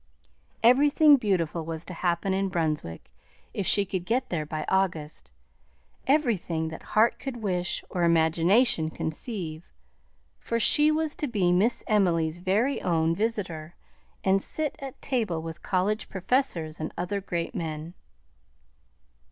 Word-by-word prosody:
Everything 290 +5 +6
beautiful 180 - 0
was 160 +1 -6
to 180 - -7
happen 175 +2 0
in 195 0 0
Brunswick 155 - -3 0.4
if 195 - -2
she 200 - +3
could 185 -2 -3
be 230 +7 +2
there 155 -4 -2
by 155 0 -4
August, 160 - -1 0.8
everything 205 - +1
that 160 - -8 0.2
heart 225 +2 +4
could 240 -4 -6
wish 180 -3 -1
or 180 - -3
imagination 170 +3 +3
conceive, 160 0 -4 0.8
for 230 - -2
she 300 +6 +4
was 310 0 0
to 295 - -3
be 200 -8 +1
Miss 205 +7 +2
Emily's 175 -6 +1
very 210 +10 +1
own 165 -2 +1
visitor, 180 -7 -3 0.5
and 195 0 +3
sit 305 +5 -2
at 270 -2 -8
table 220 -11 -1
with 165 0 -7
college 200 +3 -1
professors 185 - -1
and 155 - -4
other 200 +3 -2
great 170 -1 -3
men. 160 -3 -5
185 Hz, 135 wpm, -27 LUFS, 165-225 Hz, 0.8 s, Everything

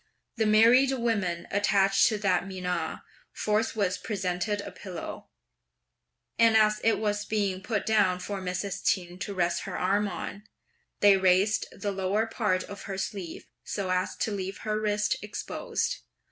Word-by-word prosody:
The 220 -1 +2
married 235 +5 +6
women 200 -9 -1
attached 195 -1 +4
to 215 - 0
that 195 -2 +1
menage 180 -2 -3 0.3
forthwith 210 -3 0
presented 190 0 -1
a - - -8
pillow; 180 -4 -8 1.1
and 230 -1 +6
as 215 -1 +3
it 225 - +3
was 210 -1 -1
being 200 -4 -1
put 210 0 -2
down 205 -5 +3
for 195 +1 -5
Mrs. 185 +2 -3
Ch'in 180 -2 0
to 200 0 -4
rest 175 -1 +1
her - - -4
arm 200 +3 +1
on, 200 +1 -6 0.6
they 200 -1 +7
raised 190 +3 +3
the 205 - -4
lower 195 +3 0
part 210 -5 0
of 200 0 -9
her 195 -1 -4
sleeve 195 -3 -5 0.2
so 195 -3 -3
as 185 0 0
to 220 - -2
leave 195 -1 -4
her 215 0 -1
wrist 210 0 +1
exposed. 465 - -3
200 Hz, 150 wpm, -28 LUFS, 185-215 Hz, 1.1 s, they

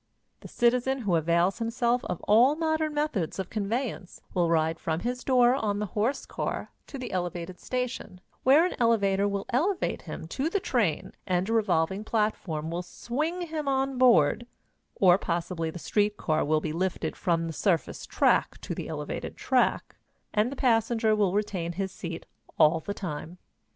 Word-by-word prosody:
The - - -11
citizen 250 +2 +1
who 200 -6 0
avails 170 +5 +2
himself 235 +1 0
of 175 - -4
all 240 +7 +5
modern 315 -1 0
methods 295 - -1
of 190 -2 -4
conveyance 215 -2 -3
will 175 -2 +2
ride 160 0 +1
from 160 0 -2
his 250 +1 -3
door 250 -2 +4
on 215 -6 -1
the 210 - -1
horse 235 +7 0
car - - -4 0.2
to 275 - -7
the 255 -2 -6
elevated 175 0 -4
station, 250 -7 -4 0.2
where 285 +6 +6
an 365 - -1
elevator 200 -4 +3
will 200 -1 -2
elevate 350 +10 0
him - - -7
to 280 +4 -1
the 400 - 0
train 235 - -1
and 180 0 +1
a 225 - -1
revolving 190 -2 +1
platform 195 -8 -1
will 170 +1 -2
swing 300 - -3
him 315 -3 -4
on 270 -1 0
board, 235 - +4 0.5
or 185 -1 +5
possibly 170 -2 -2
the 160 - -7
street 210 +4 0
car 155 -1 0
will 155 +1 +1
be 155 -1 -3
lifted 185 +2 -2
from 165 -2 0
the 165 - -4
surface 175 +1 -1
track - - +2
to - - -4
the - - -5
elevated - - -5
track, - - +1 0.4
and 215 +4 +2
the - - -5
passenger 225 -3 +2
will 205 -3 +2
retain 190 -5 -1
his 190 +1 -3
seat 170 -3 -7 0.3
all 155 +2 +5
the 200 +6 -5
time. 170 -1 -6
210 Hz, 170 wpm, -27 LUFS, 175-250 Hz, 0.5 s, where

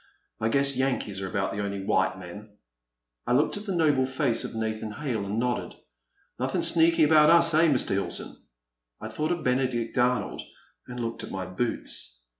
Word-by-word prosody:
I 110 - 0
guess 140 +2 +2
Yankees 125 -7 -1
are 95 - -3
about 95 +1 -1
the 100 - -3
only 100 -1 -4
white 95 0 +1
men. 105 +4 -11 0.7
I - - +2
looked 140 +5 +2
at 205 +1 -8
the 195 - -1
noble 145 -6 +2
face 130 -3 0
of - - -6
Nathan 110 -1 -3
Hale 130 -7 -3
and 105 +2 -3
nodded. 120 +1 -2 0.3
" - - -42
Nothin* - - 0
sneaky 165 -1 +5
about 150 0 +6
us, 170 -1 +5
eh, 160 +2 +5
Mr. 140 -5 +2
Hilton? 100 +1 -3 0.3
" - - -59
I 110 - -6
thought 150 +9 -2
of 175 -2 -2
Benedict 125 -2 0
Arnold 125 -3 0 0.5
and 125 0 -7
looked 115 -1 -4
at - - -7
my 95 -1 -4
boots. 90 - -4
120 Hz, 190 wpm, -27 LUFS, 105-145 Hz, 0.7 s, about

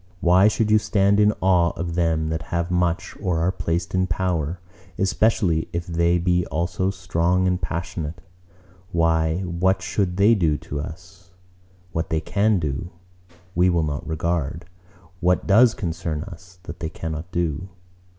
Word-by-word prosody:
Why 90 +3 +5
should 110 0 +1
you 110 - +6
stand 100 -1 +2
in 105 0 +5
awe 90 -2 +3
of 85 0 -4
them 80 -2 +1
that 80 0 -2
have 85 +1 -1
much 90 -1 0
or 90 -3 0
are 85 +3 +1
placed 85 -1 -2
in 95 0 +1
power, 85 -2 -1 0.4
especially 95 -4 +1
if 85 0 -2
they 85 0 +2
be 90 0 +1
also 85 +4 -1
strong 90 -1 0
and 90 0 0
passionate? 85 -2 -4 0.7
Why, 80 0 +1
what 90 0 0
should 90 0 -1
they 100 +3 +5
do 80 -8 +2
to 75 - -6
us? 90 +3 -10 0.6
What 80 -1 -2
they 80 - +1
can 100 +6 +1
do, 80 0 -3 0.6
we 90 +2 +3
will 85 -2 +2
not 75 -2 -3
regard: 85 0 -2 0.5
what 90 +1 +2
does 115 +4 +5
concern 85 - -3
us, 90 -1 -12
that - - -9
they 80 - -3
cannot 80 +2 -6
do. 85 +1 -2
85 Hz, 155 wpm, -23 LUFS, 80-95 Hz, 0.7 s, you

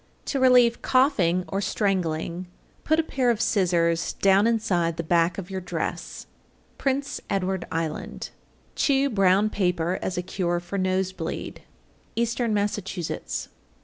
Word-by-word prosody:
To 275 - -1
relieve 250 -2 +5
coughing 200 - +2
or 195 - -2
strangling, 180 -4 -1 0.4
put 315 +1 +2
a - - +3
pair 260 -5 0
of 230 -3 +1
scissors 170 -6 +1
down 195 +2 +4
inside 180 -8 +1
the 170 - -2
back 170 +1 +2
of 195 -1 -6
your 190 -1 -3
dress. 180 - -4 0.5
Prince 275 +1 -1
Edward 190 -2 -1
Island. 165 -1 -4 0.4
855. - - -37
Chew 280 0 +3
brown 195 0 +3
paper 180 -2 0
as 185 - -3
a 180 - -1
cure 175 -1 -1
for 175 +3 -5
nose 185 0 0
bleed. - - -5 0.6
_Eastern 235 0 0
Massachusetts. 200 -4 -2
190 Hz, 140 wpm, -25 LUFS, 175-230 Hz, 0.6 s, relieve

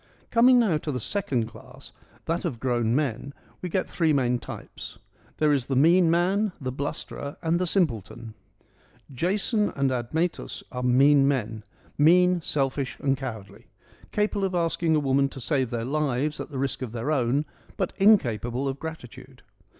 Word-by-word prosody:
Coming 245 +2 +6
now 190 -10 +2
to 150 - -4
the 125 - -3
second 130 - -1
class, 115 - -13 0.3
that 165 +2 -1
of 145 -10 -3
grown 120 -2 0
men, 140 -1 -2 0.3
we 180 - -4
get 185 +2 -1
three 160 -3 +1
main 125 -3 +1
types: - - -9 0.4
there 150 -1 +3
is 135 -4 -1
the 135 - -1
mean 165 +5 +5
man, 185 +4 +1
the 130 -3 -4
blusterer, 140 +1 -5
and 165 +1 +1
the 180 - 0
simpleton. 115 - -1 0.8
Jason 205 - 0
and 140 -2 +1
Admetus 155 +8 -2
are 125 - -4
mean 135 +3 +5
men: 110 -6 -1 0.4
mean, 180 +3 +5
selfish 135 -3 -2
and 135 -1 +1
cowardly: 120 -7 -8 0.4
capable 210 -1 0
of 190 -1 -1
asking 165 -1 +1
a - - +3
woman 135 -1 +2
to 135 - -10
save 130 -2 0
their 115 -1 -3
lives 145 +1 -1
at - - -6
the 140 - -6
risk 135 0 -2
of 120 -3 -5
her 120 +5 -2
own, 135 +1 +1 0.3
but 190 - -2
incapable 130 - +3
of 135 0 -3
gratitude. 160 -7 -9
140 Hz, 165 wpm, -26 LUFS, 125-170 Hz, 0.8 s, Coming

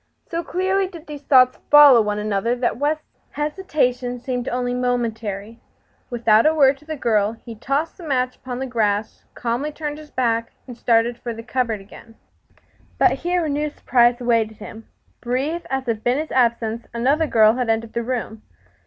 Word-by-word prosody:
So 335 0 -1
clearly 380 +2 0
did 340 -4 -12
these 295 -3 -8
thoughts 255 -3 +4
follow 290 -5 +8
one 210 -1 -1
another 210 +3 -1
that 245 -1 -1
West's 305 +2 -3
hesitation 295 -6 -1
seemed 250 -1 -3
only 245 0 -2
momentary. 230 -4 -3 0.5
Without 230 0 +3
a 315 - +3
word 275 -2 +4
to 300 - -20
the 315 0 -4
girl 215 -5 +1
he 230 +1 -11
tossed 275 +8 -2
the - - -10
match 255 -4 -1
upon 250 -1 -6
the 265 - -3
grass, 215 -4 -1
calmly 245 +5 -2
turned 300 0 -5
his 305 -1 -13
back, 230 -3 -1
and 245 - -9
started 235 0 +1
for 235 -1 -5
the 230 - -8
cupboard 235 -4 -2
again. 225 +3 -15 0.8
But - - +4
here 350 -1 -1
a - - -2
new 295 +1 -1
surprise 240 -3 +2
awaited 230 -3 0
him. 225 0 -11 0.3
Brief 270 +8 -2
as 265 0 -2
had 225 -3 -2
been 245 +2 +1
his 310 +1 -4
absence, 235 -2 0
another 280 +7 +2
girl 220 -4 +5
had 245 -1 -2
entered 225 0 -1
the 235 - -1
room. 230 -3 -4
245 Hz, 180 wpm, -21 LUFS, 230-290 Hz, 0.8 s, follow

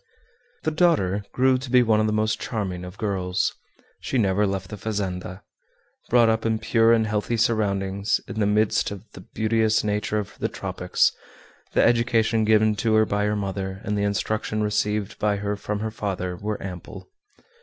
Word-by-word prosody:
The 155 - 0
daughter 150 - +2
grew 130 0 +3
to 130 0 -7
be 125 0 +5
one 110 -2 +3
of 110 - +2
the - - 0
most 110 0 0
charming 95 -6 -3
of 90 +2 -9
girls. 95 -3 -1 0.5
She 135 - -2
never 100 -2 +2
left 95 -1 -3
the - - -4
fazenda. 95 -3 -4 0.7
Brought 120 -1 +5
up 110 0 +1
in 110 -1 +1
pure 115 +1 +3
and 115 -1 +4
healthy 110 +2 -1
surroundings, 100 -3 +1
in 110 - -5
the 105 - +2
midst 110 +1 +2
of 100 -2 -8
the - - -11
beauteous 110 0 +1
nature 105 0 -1
of 105 -2 -5
the - - -1
tropics, - - 0 0.6
the - - +4
education 115 -2 +2
given 110 0 +4
to 110 0 +1
her 110 0 +5
by 105 0 0
her 105 0 0
mother, 95 -1 -3
and 105 - -2
the 100 - 0
instruction 105 +1 -1
received 105 0 -1
by 105 -1 +1
her 100 0 -2
from 105 0 -4
her 110 0 -2
father, 95 -4 -3
were 105 +4 -3
ample. 90 - -8
105 Hz, 180 wpm, -24 LUFS, 100-110 Hz, 0.7 s, be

